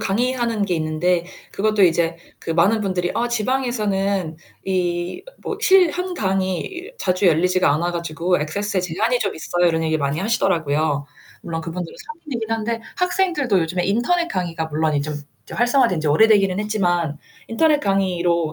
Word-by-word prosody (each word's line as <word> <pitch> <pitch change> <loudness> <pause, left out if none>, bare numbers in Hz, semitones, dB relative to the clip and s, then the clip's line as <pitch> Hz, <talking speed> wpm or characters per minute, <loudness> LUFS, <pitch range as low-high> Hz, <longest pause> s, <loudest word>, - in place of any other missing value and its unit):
강의하는 235 0 0
게 180 -3 -1
있는데 165 +2 0 0.3
그것도 210 -1 +2
이제 165 -1 +2 0.2
그 - - -5
많은 185 +7 +3
분들이 185 -3 -1
"아 240 - 0
지방에서는 210 -8 -1 0.3
이 175 -1 -1 0.2
뭐 430 - -4
실 380 -5 +5
한 360 +1 -3
강의 195 - -2
자주 185 +1 +1
열리지가 180 0 +3
않아 170 +4 0
가지고 170 +1 -1
액세스에 195 +6 -2
제한이 210 +8 0
좀 200 - -2
있어요." 175 +2 0
이런 160 -1 0
얘기를 160 -1 0
많이 140 +2 -1
하시더라고요. 160 -8 0 0.4
물론 165 -1 -4
그분들은 165 +1 -6
성인이긴 290 -8 -7
한데 225 +1 -1 0.2
학생들도 350 - +1
요즘에 175 +2 -1
인터넷 240 - +1
강의가 170 - -3
물론 155 0 0
이 - - +1
좀 150 +1 -4 0.4
활성화된 240 - +2
지 155 - -1
오래되기는 195 +3 +4
했지만 175 -8 0 0.3
인터넷 300 +6 +3
강의로 180 - 0
185 Hz, 370 characters per minute, -21 LUFS, 165-225 Hz, 0.4 s, 실